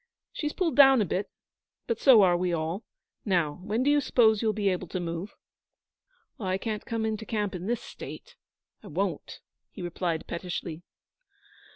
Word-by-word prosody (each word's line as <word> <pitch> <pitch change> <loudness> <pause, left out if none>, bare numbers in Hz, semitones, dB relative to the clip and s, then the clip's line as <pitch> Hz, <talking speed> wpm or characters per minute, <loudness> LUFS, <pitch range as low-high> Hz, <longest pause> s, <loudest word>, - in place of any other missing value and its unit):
She's 300 -1 -2
pulled 350 -4 0
down 270 -2 +8
a 210 - +2
bit, 190 +3 -2 0.6
but 230 -2 -2
so 245 -7 +7
are 180 -2 +4
we 180 0 0
all. 165 +4 -2 0.4
Now, 175 -7 0
when 215 +6 -1
do 285 - +3
you 290 0 +4
suppose 220 -5 +4
you'll 220 -2 +2
be 205 -1 0
able 185 -1 -2
to 185 - -4
move?' 170 +3 -5 1.0
'I 190 -3 -1
can't 215 +1 -4
come 225 -1 -1
into 220 0 -2
camp 210 -2 -2
in 180 +1 -5
this 240 0 -1
state. - - -10 0.5
I - - -12
won't,' - - -3 0.3
he 190 - -9
replied 175 -1 -2
pettishly. 170 -2 -5
200 Hz, 170 wpm, -28 LUFS, 175-225 Hz, 1.0 s, down